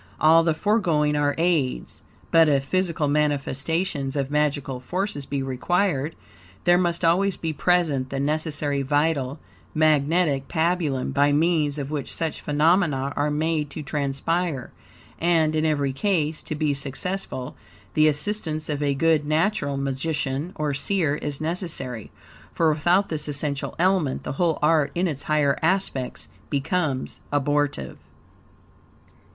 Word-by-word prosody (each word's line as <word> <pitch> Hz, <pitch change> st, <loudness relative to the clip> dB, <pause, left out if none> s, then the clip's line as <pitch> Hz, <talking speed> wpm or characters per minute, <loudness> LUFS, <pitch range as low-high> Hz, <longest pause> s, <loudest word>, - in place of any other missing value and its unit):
All 165 Hz, +2 st, +6 dB
the 165 Hz, -1 st, +1 dB
foregoing 165 Hz, -7 st, +1 dB
are 145 Hz, -1 st, +1 dB
aids, 160 Hz, -6 st, 0 dB, 0.3 s
but 165 Hz, -1 st, +6 dB
if 140 Hz, -2 st, +2 dB
physical 170 Hz, -1 st, 0 dB
manifestations 145 Hz, +1 st, 0 dB
of 140 Hz, -1 st, -2 dB
magical 145 Hz, -3 st, 0 dB
forces 175 Hz, +1 st, -3 dB
be 140 Hz, -1 st, -2 dB
required, 150 Hz, +3 st, 0 dB, 0.5 s
there 175 Hz, 0 st, +5 dB
must 175 Hz, -1 st, 0 dB
always 190 Hz, +4 st, +2 dB
be 160 Hz, -1 st, -3 dB
present 155 Hz, -5 st, +1 dB
the 135 Hz, -, -3 dB
necessary 145 Hz, -1 st, 0 dB
vital, 145 Hz, -1 st, 0 dB, 0.4 s
magnetic 155 Hz, -1 st, +2 dB
pabulum, 160 Hz, -5 st, 0 dB
by 145 Hz, +1 st, +3 dB
means 150 Hz, -1 st, +2 dB
of 140 Hz, 0 st, -4 dB
which 145 Hz, -3 st, -3 dB
such 160 Hz, -2 st, -3 dB
phenomena 150 Hz, -2 st, +2 dB
are 145 Hz, +1 st, +1 dB
made 155 Hz, 0 st, 0 dB
to 150 Hz, -, -7 dB
transpire; 145 Hz, +1 st, -2 dB, 0.5 s
and 165 Hz, -2 st, +2 dB
in 155 Hz, 0 st, +2 dB
every 145 Hz, -3 st, 0 dB
case, 155 Hz, -1 st, 0 dB
to 155 Hz, -, -4 dB
be 150 Hz, -1 st, 0 dB
successful, 140 Hz, 0 st, -4 dB, 0.4 s
the 155 Hz, 0 st, +4 dB
assistance 155 Hz, 0 st, -1 dB
of 145 Hz, -1 st, -2 dB
a 140 Hz, -1 st, +1 dB
good 160 Hz, +1 st, +3 dB
natural 155 Hz, -2 st, +1 dB
magician, 140 Hz, +2 st, -2 dB
or 150 Hz, -2 st, -1 dB
seer, 155 Hz, +1 st, 0 dB
is 145 Hz, -2 st, -4 dB
necessary; 155 Hz, -, -3 dB, 0.5 s
for 160 Hz, -2 st, +3 dB
without 175 Hz, +6 st, +2 dB
this 155 Hz, -2 st, 0 dB
essential 145 Hz, -1 st, -2 dB
element 180 Hz, -6 st, +1 dB
the -, -, -4 dB
whole 165 Hz, +2 st, +1 dB
art, 150 Hz, -2 st, +3 dB
in 180 Hz, +2 st, +1 dB
its 145 Hz, -4 st, -4 dB
higher 150 Hz, -3 st, +1 dB
aspects, 160 Hz, -7 st, -1 dB, 0.2 s
becomes 140 Hz, -1 st, -2 dB
abortive. 145 Hz, -, -1 dB
150 Hz, 135 wpm, -24 LUFS, 140-165 Hz, 0.5 s, All